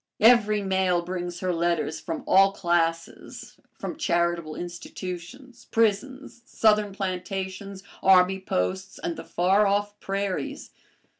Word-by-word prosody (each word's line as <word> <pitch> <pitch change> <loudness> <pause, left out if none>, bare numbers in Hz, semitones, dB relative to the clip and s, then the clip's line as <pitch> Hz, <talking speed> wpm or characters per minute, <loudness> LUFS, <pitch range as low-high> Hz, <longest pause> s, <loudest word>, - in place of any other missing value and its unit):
Every 215 -3 +5
mail 190 -2 +1
brings 175 -1 -5
her 185 -1 0
letters 170 -2 -1
from 165 - -5
all 195 +1 +5
classes, 170 -3 -2 0.2
from 305 - -5
charitable 170 - 0
institutions, 180 +8 -8
prisons, 240 +4 -1
Southern 210 -3 +2
plantations, 190 0 -5 0.2
army 190 0 +5
posts, 190 - -2
and 340 0 -4
the - - -8
far 190 +4 +2
off 205 +1 -1
prairies. 200 +8 -3
190 Hz, 115 wpm, -26 LUFS, 175-205 Hz, 0.2 s, Every